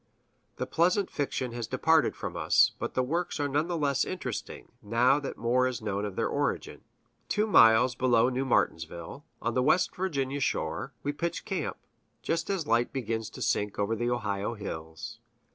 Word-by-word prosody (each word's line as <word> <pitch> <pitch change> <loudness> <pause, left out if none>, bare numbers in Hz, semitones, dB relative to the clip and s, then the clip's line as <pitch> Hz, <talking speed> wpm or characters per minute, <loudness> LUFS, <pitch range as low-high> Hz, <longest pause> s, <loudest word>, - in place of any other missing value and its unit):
That 130 0 -5
pleasant 180 +4 +2
fiction 130 -3 -2
has 120 -1 -4
departed - - +3
from - - -5
us; - - +4
but - - -4
the 130 - +2
works 170 +5 -2
are 145 - +1
none 145 +3 0
the 175 -1 -2
less 140 -3 +1
interesting, 130 - -5
now 120 +6 +3
that 140 - -6
more 125 +2 +2
is 125 -3 -3
known 105 -1 -2
of 100 -2 -5
their - - 0
origin. - - -2 0.5
Two 210 - +2
miles 120 - +6
below 120 -2 +3
New 130 +1 -1
Martinsville, 85 - -1 0.2
on 115 - 0
the 125 - +2
West 155 +7 +2
Virginia 145 -7 -1
shore, 135 - -2
we 145 - -1
pitch 170 +3 -3
camp, 195 -4 -3 0.5
just 165 0 -1
as 195 -4 0
the - - -11
light 115 +1 +3
begins 115 -4 -3
to - - -6
sink 105 -1 0
over 105 +2 0
the 120 +2 -1
Ohio 110 -2 -2
hills. 80 -6 -7
125 Hz, 180 wpm, -29 LUFS, 115-145 Hz, 0.5 s, miles